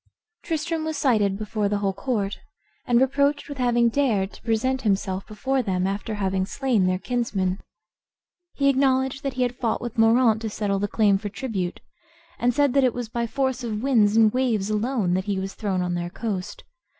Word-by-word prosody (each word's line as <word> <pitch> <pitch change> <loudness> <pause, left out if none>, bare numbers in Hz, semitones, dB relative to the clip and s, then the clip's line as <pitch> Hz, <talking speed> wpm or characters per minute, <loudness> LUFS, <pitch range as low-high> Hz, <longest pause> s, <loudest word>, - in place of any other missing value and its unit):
Tristram 330 -2 -2
was 315 -1 -3
cited 210 -8 +2
before 210 -1 -2
the 205 - 0
whole 200 -1 -1
court, 205 -2 -2 0.5
and 240 -1 +4
reproached 280 +2 +1
with 285 -2 -8
having 240 -1 +3
dared 225 -6 +1
to - - -14
present 250 +4 0
himself 195 -3 -1
before 260 +5 -1
them 185 -5 -1
after 200 +3 -3
having 190 -2 0
slain 240 -9 +1
their 185 0 +1
kinsman. 200 -5 -1 1.0
He 275 - +1
acknowledged 265 0 +2
that 275 -3 -3
he 255 - 0
had 245 0 -1
fought 230 -3 -1
with 240 -1 -5
Moraunt 225 0 +4
to 225 - -3
settle 205 -2 -1
the 205 - 0
claim 205 -2 +2
for 205 0 -5
tribute, 200 -5 -4 0.6
and 245 +1 +3
said 280 +1 +2
that 275 -1 +4
it 250 -3 +2
was 245 -2 -4
by 235 0 -2
force 260 0 -1
of 220 -1 -3
winds 225 -6 +3
and 220 -2 +5
waves 230 -6 0
alone 215 -3 0
that 185 +1 0
he 200 -2 -1
was 195 0 -4
thrown 190 -4 -2
on 180 0 -2
their 175 0 -3
coast. 195 -2 -5
225 Hz, 195 wpm, -24 LUFS, 200-260 Hz, 1.0 s, and